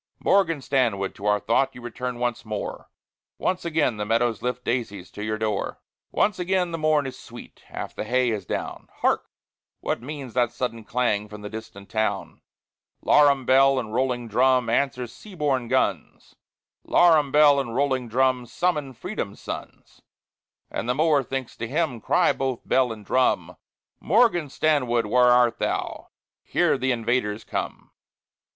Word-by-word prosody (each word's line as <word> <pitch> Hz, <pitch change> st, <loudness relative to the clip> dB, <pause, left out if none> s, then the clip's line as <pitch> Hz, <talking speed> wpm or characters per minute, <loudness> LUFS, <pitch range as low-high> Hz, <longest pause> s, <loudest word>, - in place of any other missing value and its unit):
Morgan 165 Hz, -7 st, +2 dB
Stanwood, 115 Hz, -9 st, 0 dB
to 105 Hz, -, -6 dB
our 105 Hz, 0 st, +3 dB
thought 130 Hz, +6 st, +1 dB
You 125 Hz, -, -10 dB
return 125 Hz, +1 st, -5 dB
once 120 Hz, -1 st, -2 dB
more; 105 Hz, -2 st, -5 dB, 0.5 s
Once 185 Hz, -1 st, -1 dB
again 155 Hz, -8 st, +1 dB
the 105 Hz, -, -2 dB
meadows 115 Hz, 0 st, +1 dB
lift 125 Hz, 0 st, -3 dB
Daisies 110 Hz, -6 st, -3 dB
to 105 Hz, -, -7 dB
your 110 Hz, 0 st, -2 dB
door. 110 Hz, -2 st, -2 dB, 0.3 s
Once 205 Hz, -2 st, +1 dB
again 180 Hz, -1 st, 0 dB
the 165 Hz, -, -3 dB
morn 155 Hz, -2 st, +2 dB
is 135 Hz, -, -7 dB
sweet, -, -, -12 dB
Half -, -, -6 dB
the -, -, -4 dB
hay 125 Hz, +2 st, +1 dB
is 105 Hz, -3 st, -3 dB
down, -, -, -5 dB
Hark! -, -, +1 dB, 0.5 s
what -, -, -2 dB
means 135 Hz, -2 st, -7 dB
that 120 Hz, -2 st, +2 dB
sudden 120 Hz, -3 st, -4 dB
clang 105 Hz, -4 st, 0 dB
From 105 Hz, 0 st, -10 dB
the 105 Hz, -, -7 dB
distant 110 Hz, -3 st, -9 dB
town? 110 Hz, 0 st, -2 dB, 0.6 s
Larum 140 Hz, -3 st, +4 dB
bell 135 Hz, +1 st, +5 dB
and 110 Hz, -4 st, -3 dB
rolling 125 Hz, -1 st, 0 dB
drum 125 Hz, +2 st, +2 dB
Answer 130 Hz, -3 st, 0 dB
sea 195 Hz, -, -13 dB
borne 135 Hz, -6 st, 0 dB
guns; -, -, -1 dB, 0.5 s
Larum 160 Hz, -5 st, +4 dB
bell 145 Hz, -1 st, +6 dB
and 120 Hz, -4 st, -4 dB
rolling 130 Hz, -2 st, 0 dB
drum 125 Hz, +1 st, +1 dB
Summon 150 Hz, -3 st, -1 dB
Freedom's 130 Hz, -, -5 dB
sons! -, -, -9 dB, 0.7 s
And 115 Hz, -, -3 dB
the 125 Hz, -, +2 dB
mower 155 Hz, -1 st, +3 dB
thinks 135 Hz, -1 st, -5 dB
to 115 Hz, -, -4 dB
him 140 Hz, -3 st, -1 dB
Cry -, -, +3 dB
both 130 Hz, -3 st, -3 dB
bell 130 Hz, -2 st, +3 dB
and 105 Hz, -2 st, -9 dB
drum, 130 Hz, +4 st, +1 dB, 0.4 s
"Morgan 180 Hz, -, +3 dB
Stanwood, 125 Hz, -6 st, +1 dB
where 125 Hz, +4 st, +4 dB
art 120 Hz, -1 st, +4 dB
thou? -, -, -2 dB, 0.3 s
Here -, -, +1 dB
th' -, -, -2 dB
invaders 115 Hz, -3 st, 0 dB
come!" -, -, -5 dB
125 Hz, 160 wpm, -24 LUFS, 115-140 Hz, 0.7 s, bell